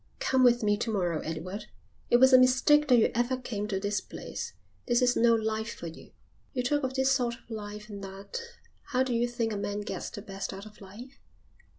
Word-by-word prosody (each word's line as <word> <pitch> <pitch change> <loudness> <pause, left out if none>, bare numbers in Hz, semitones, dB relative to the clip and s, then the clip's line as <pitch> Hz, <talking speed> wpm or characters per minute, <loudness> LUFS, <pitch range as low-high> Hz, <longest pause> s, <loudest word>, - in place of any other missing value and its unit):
"Come 260 -1 +2
with 240 -2 +5
me 205 0 +3
to 225 +1 -2
morrow, 175 -6 0
Edward. 185 +6 -5 0.4
It 240 - +6
was 260 +1 +6
a 255 - +10
mistake 260 +4 +5
that 250 -3 +6
you 225 - +4
ever 240 +3 +1
came 210 -5 -4
to 195 -2 -1
this 205 +1 -1
place. - - -7 0.3
This 240 -1 +3
is 245 -1 +3
no 230 0 +5
life 220 0 -2
for - - -9
you." 165 0 -9 0.4
"You 250 -3 -1
talk 290 +4 +1
of 260 0 -2
this 265 0 +3
sort 245 -3 +1
of 245 - -20
life 210 -1 -6
and 200 -2 -8
that. 195 - -7 0.5
How 255 +1 +4
do 260 -2 -2
you 235 +1 +2
think 235 -2 -2
a - - -2
man 205 +1 -3
gets 205 - -5
the 205 - -8
best 195 0 -5
out 195 +2 -8
of 210 -1 -14
life?" 230 +8 -12
230 Hz, 225 wpm, -29 LUFS, 205-255 Hz, 0.5 s, a